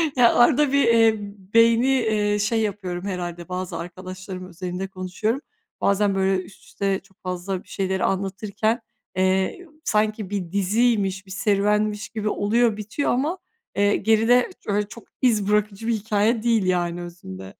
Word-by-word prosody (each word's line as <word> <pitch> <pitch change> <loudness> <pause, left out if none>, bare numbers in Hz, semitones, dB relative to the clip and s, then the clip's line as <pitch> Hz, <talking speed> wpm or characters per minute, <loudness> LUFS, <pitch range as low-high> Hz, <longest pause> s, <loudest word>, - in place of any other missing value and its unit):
Ya, 245 -2 +5
arada 275 +3 +5
bir, 280 0 +4
eee, 225 -1 +5 0.4
beyni, 230 +2 +5
eee, 215 -5 +2
şey 220 +2 +1
yapıyorum 190 -4 -3
herhâlde, 175 -2 -5
bazı 180 0 -4
arkadaşlarımın 185 +1 -7
özelinde 180 +2 -5
konuşuyorum. 190 +7 -2 0.4
Bazen 200 0 +2
böyle 190 -1 +1
üst 190 - -16
üste 195 -1 -1
çok 195 -1 -26
fazla 185 +1 -3
bir - - -29
şeyleri 190 -1 -2
anlatırken, 205 +4 -1 0.3
eee, 190 - +1
ı - - -23
sanki 215 -3 0
bir 185 -4 -3
diziymiş, 200 -1 +1
bir 190 - -13
serüvenmiş 210 +1 +1
gibi 215 -1 -2
oluyor, 220 +2 +2
bitiyor 215 +7 -2
ama, 295 +9 0 0.4
eee, 205 0 +3
geride 225 +3 +3 0.2
öyle 205 0 0
çok 235 - -11 0.2
iz 215 -5 +2
bırakıcı 210 +1 0
bir 235 - +2
hikâye 220 +1 +1
değil 225 -5 +2
yani 175 -1 0
özünde. 95 - -9
205 Hz, 150 wpm, -23 LUFS, 185-225 Hz, 0.4 s, Ya